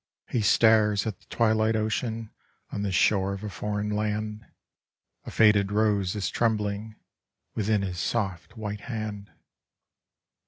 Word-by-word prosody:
.1 - - -19
He 120 - +2
stares 105 -1 +4
at 110 -5 -4
the - - -27
twilight 110 -1 +2
ocean 110 0 -2 0.4
on 100 - -3
the 100 -1 -1
shore 95 +1 +2
of 100 +1 -7
a 105 - -3
foreign 105 +2 -3
land, 105 +1 -2 0.8
a - - -6
faded 105 -2 +4
rose 105 -2 +1
is 95 -4 -2
trembling 110 -1 -1 0.6
within 105 -1 +1
his 90 -2 -4
soft 95 +4 -2
white 105 -1 -5
hand. 105 -4 -5
105 Hz, 140 wpm, -27 LUFS, 100-110 Hz, 0.8 s, stares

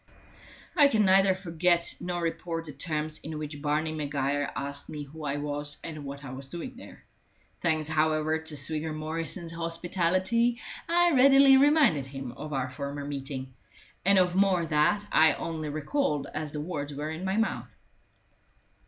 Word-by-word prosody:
I 295 -4 +7
can 220 -6 +2
neither 190 0 +5
forget 175 -1 +1
nor 175 -1 -3
report 165 0 -3
the 155 - -7
terms 155 +1 -3
in 155 0 -6
which 150 -1 -6
Barney 155 +2 0
Maguire 145 -1 -1
asked 140 0 -3
me 150 -1 -5
who 155 +3 -11
I 145 0 -1
was 145 0 -3
and 155 -3 -7
what 140 +1 -7
I 130 - -7
was 135 +1 -8
doing 210 - -6
there. 255 - -13 0.5
Thanks, 160 -3 0
however, 155 0 +1
to 160 -1 -5
Swigger 155 +3 0
Morrison's 165 +2 -4
hospitality, 180 +7 0 0.3
I 345 0 +4
readily 270 0 +7
reminded 275 - +4
him 135 -2 -6
of 150 +4 -8
our 135 -2 -1
former 140 +2 -5
meeting, 135 -2 -5 0.5
and 195 +1 +5
of 180 -1 +3
more 190 -3 +3
that 155 +6 +2
I 160 -1 +6
only 160 -2 -4
recalled 150 - -1
as 155 -1 -3
the 150 - -4
words 150 -3 -5
were 150 +2 -4
in 160 +3 -6
my 190 +2 -1
mouth. 225 0 -2
155 Hz, 160 wpm, -28 LUFS, 145-180 Hz, 0.5 s, I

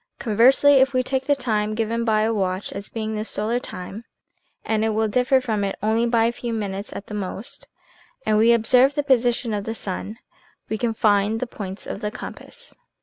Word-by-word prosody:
Conversely, 260 +5 +5
if 265 0 +3
we 255 - +3
take 260 0 -2
the 290 - +4
time 215 -5 -1
given 230 +1 -1
by 215 -2 +2
a 225 +1 +1
watch 190 -2 -2
as 200 - -7
being 220 -1 -4
the 215 0 -2
solar 225 +2 -1
time 195 0 -8 0.6
(and 220 -1 0
it 220 -1 0
will 220 0 +2
differ 250 +4 +3
from 220 -5 -2
it 195 - -2
only 225 +2 +2
by 230 -1 +3
a 230 - +2
few 235 0 -5
minutes 200 -2 -4
at 200 - -7
the - - -9
most), 205 +2 -6 0.6
and 215 -1 +3
we 230 +2 +5
observe 250 +4 +4
the 290 - 0
position 245 -3 +2
of 205 -1 -3
the 225 - -3
sun, 205 +2 -5 0.5
we 220 - -1
can 230 -2 -1
find 210 +1 +2
the 255 - -1
points 200 -5 -7
of - - -6
the 210 - -1
compass. - - -9
220 Hz, 205 wpm, -23 LUFS, 210-245 Hz, 0.6 s, Conversely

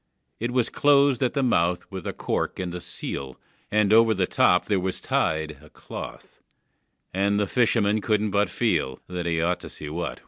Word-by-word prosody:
It 120 - -1
was 125 -1 0
closed 140 -3 +4
at 130 - +1
the 140 - 0
mouth 90 -7 +1
with 95 -3 -6
a - - -1
cork - - -2
and 90 -2 -4
a 90 - -5
seal, 65 -5 -6 0.3
And 105 0 +3
over 115 0 +6
the 95 -1 +1
top 90 0 +3
there 100 -3 +1
was 95 0 -3
tied 80 -1 -1
A - - -16
cloth, - - -10 0.7
and 100 +2 +1
the 105 - +2
fisherman 110 -2 +2
couldn't 105 -1 +1
but 100 -1 +2
feel 65 -6 0
That 90 -1 -4
he 85 -1 0
ought 90 +1 +1
to - - -9
see 75 - -8
what 80 +3 -5
was 85 - -1
inside. - - -16
100 Hz, 205 wpm, -25 LUFS, 85-110 Hz, 0.7 s, over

